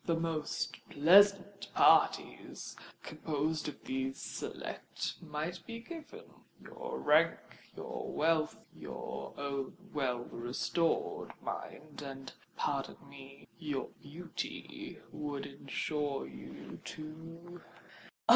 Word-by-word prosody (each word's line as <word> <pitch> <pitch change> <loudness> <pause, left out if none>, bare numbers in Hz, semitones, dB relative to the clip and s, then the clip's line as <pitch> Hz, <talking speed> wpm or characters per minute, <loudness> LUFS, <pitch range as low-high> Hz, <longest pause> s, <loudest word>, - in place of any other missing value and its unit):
The 170 - +3
most 165 -2 0
pleasant 200 +5 +6
parties, - - +5 0.3
composed 155 +1 0
of 150 - -6
these 265 +1 -1
select, - - -3
might 165 +2 -3
be 230 0 -4
given: 320 +5 -8 0.4
your 470 0 -5
rank—your - - +2
wealth—your 160 0 0
own 140 0 -2 0.2
well 125 -3 -1
stored 165 -1 +1
mind—and, 140 -3 -5 0.2
pardon 140 -2 0
me, 135 -1 -11
your 145 -5 -1
beauty,—would 175 - -5
ensure 140 - -1
to 65 - -9
you——" 165 +3 -8 0.7
"Oh! - - -3
155 Hz, 85 wpm, -35 LUFS, 140-185 Hz, 0.7 s, pleasant